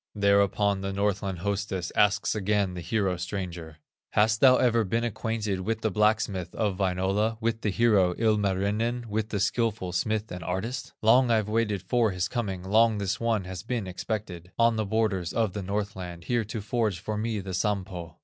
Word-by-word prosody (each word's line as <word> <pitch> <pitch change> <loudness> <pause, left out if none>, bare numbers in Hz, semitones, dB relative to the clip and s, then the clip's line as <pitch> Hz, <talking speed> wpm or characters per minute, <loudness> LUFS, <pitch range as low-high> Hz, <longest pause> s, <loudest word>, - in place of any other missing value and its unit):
Thereupon 100 0 +2
the 95 0 -3
Northland 100 -1 -1
hostess 100 -3 -2
Asks 105 -1 +3
again 100 -2 0
the 90 - -6
hero 95 -2 0
stranger: 85 -3 -5 0.4
"Hast 110 +1 +3
thou 130 -1 +7
ever 115 -2 +3
been 115 +4 -1
acquainted 110 -3 -2
With 110 +3 -2
the 110 - 0
blacksmith 105 -3 +1
of 105 -4 0
Wainola, 95 +4 0
With 115 0 -1
the 105 - 0
hero, 100 -4 +3
Ilmarinen, 105 +2 0
With 110 +1 -2
the 105 - -2
skilful 105 -1 0
smith 110 +4 -1
and 90 -1 -6
artist? 110 +9 -4
Long 125 +3 +5
I've 110 -3 +2
waited 105 -4 0
for 120 -3 +2
his 90 -2 -1
coming, 100 -7 -3
Long 110 +3 +3
this 100 -1 -2
one 115 -4 0
has 90 -1 -6
been 115 0 -3
expected, 90 -2 -5
On 115 0 +4
the 110 -1 -1
borders 100 -5 0
of 110 -5 0
the 105 - -3
Northland, 95 -3 -4
Here 120 +2 0
to 110 +1 -5
forge 110 -3 0
for 105 +4 -4
me 110 0 -2
the 95 -1 -6
Sampo." 90 -4 -2
105 Hz, 180 wpm, -27 LUFS, 95-110 Hz, 0.4 s, thou